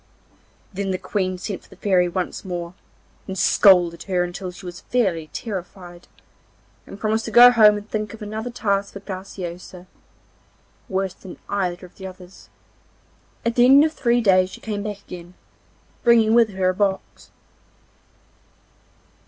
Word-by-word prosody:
Then 195 +1 -3
the 185 - -1
Queen 185 -1 -2
sent 190 +1 -5
for - - -22
the - - -15
Fairy 185 -3 +2
once 180 0 -4
more, 175 -2 -5 0.5
and 190 -1 -5
scolded 175 -3 +4
her 180 -2 0
until 180 +1 -5
she 180 +1 -12
was 180 0 -8
fairly 185 -11 -1
terrified, 180 -4 -7 0.8
and 200 - -11
promised 220 +1 -1
to - - -4
go 240 +3 +9
home 215 -3 +6
and 205 +1 -9
think 215 -1 -3
of 220 - -10
another 220 +3 -5
task 200 -4 -1
for 200 - -7
Graciosa, 185 -2 -8 1.0
worse 190 -1 -1
than 185 - -12
either 185 -3 -2
of 180 - -18
the 190 - -7
others. 185 0 -14 1.0
At 235 - +1
the 240 +1 +5
end 275 +3 +7
of 315 - -2
three 240 -4 +1
days 185 -3 +4
she - - -11
came 210 -1 -4
again, 180 -3 -9 0.7
bringing 225 -2 +4
with 230 -1 +5
her 190 -2 0
a - - 0
box. 195 0 -3
195 Hz, 155 wpm, -22 LUFS, 180-215 Hz, 1.0 s, go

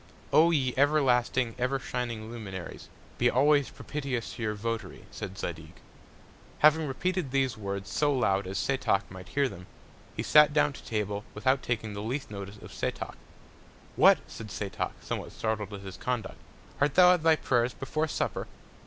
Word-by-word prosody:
O 165 +2 +7
ye 135 -6 +1
everlasting, 130 -4 +3
ever 130 +2 +1
shining 120 -4 -4
Luminaries, 95 -6 -7 0.3
be 120 - +4
always 145 +2 +4
propitious 135 -5 -4
to - - -9
your 105 -1 -1
Votary, 115 +2 -4
said 95 - -7
Zadig. 80 -3 -5 0.8
Having 155 +1 +5
repeated 175 +3 -1
these 135 -2 +1
Words 100 -2 -4
so 150 -1 +2
loud 100 -8 +1
as 95 +1 -4
Setoc 130 -7 +1
might 95 -1 -9
hear 140 -1 +2
them, 90 -5 -10 0.5
he - - -1
sat 150 -1 +6
down 150 -1 +3
to - - -11
Table, 105 -2 -2
without 130 +5 +2
taking 110 -3 -2
the 100 - -5
least 125 +3 -3
Notice 100 0 -7
of - - -12
Setoc. - - -3 0.8
What! - - +7
said 115 - -9
Setoc, 100 +2 -3
somewhat - - -4
startled 110 -2 -2
at 100 -1 -7
his 95 -2 -8
Conduct, 125 -3 -3 0.4
art 140 0 +2
thou 180 0 +8
at 180 - 0
thy 160 0 +5
Prayers 120 -4 +1
before 155 +4 -2
Supper? - - -2
125 Hz, 165 wpm, -29 LUFS, 105-140 Hz, 0.8 s, thou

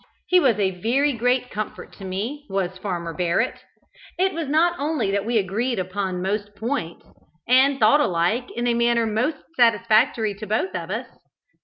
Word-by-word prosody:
He 365 - +4
was 255 - +3
a 190 -3 -1
very 275 +6 +2
great 245 +1 0
comfort 215 0 -6
to - - -11
me, 230 +11 -4
was 190 -1 -2
Farmer 175 -4 -4
Barrett. 180 +7 0 0.6
It 380 +2 +2
was 325 -2 -3
not 320 +4 +3
only 295 -8 0
that 200 +1 -1
we 235 -1 +1
agreed 220 +5 -1
upon 185 -1 -3
most 205 +1 -3
points, 220 -8 -4 0.4
and 265 +3 +4
thought 220 +6 +5
alike 190 +3 0
in 240 - -2
a 240 - +2
manner 235 0 +2
most 225 +8 0 0.2
satisfactory 220 -1 +3
to 210 +2 -9
both 190 -3 -1
of 170 -2 -5
us. 225 +6 -3
220 Hz, 170 wpm, -23 LUFS, 190-255 Hz, 0.6 s, thought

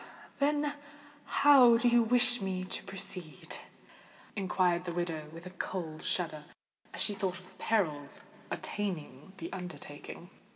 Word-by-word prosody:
"Then 290 +1 +1 0.5
how 260 -5 +7
do 240 +1 +2
you 240 0 +5
wish 245 +1 +6
me 190 -1 -2
to 185 - -4
proceed?" 180 -6 -2 0.8
inquired 180 -2 +1
the 175 - -3
widow, 165 -3 -3
with 165 +2 -11
a 185 - -8
cold 170 -4 -5
shudder, 155 -4 -2 0.5
as - - -6
she 210 - +1
thought 190 -2 -2
of 185 0 -14
the - - -14
perils 155 -10 0 0.3
attending 180 -5 -5
the 170 -2 -7
undertaking. 175 -1 -8
185 Hz, 135 wpm, -31 LUFS, 165-220 Hz, 0.8 s, how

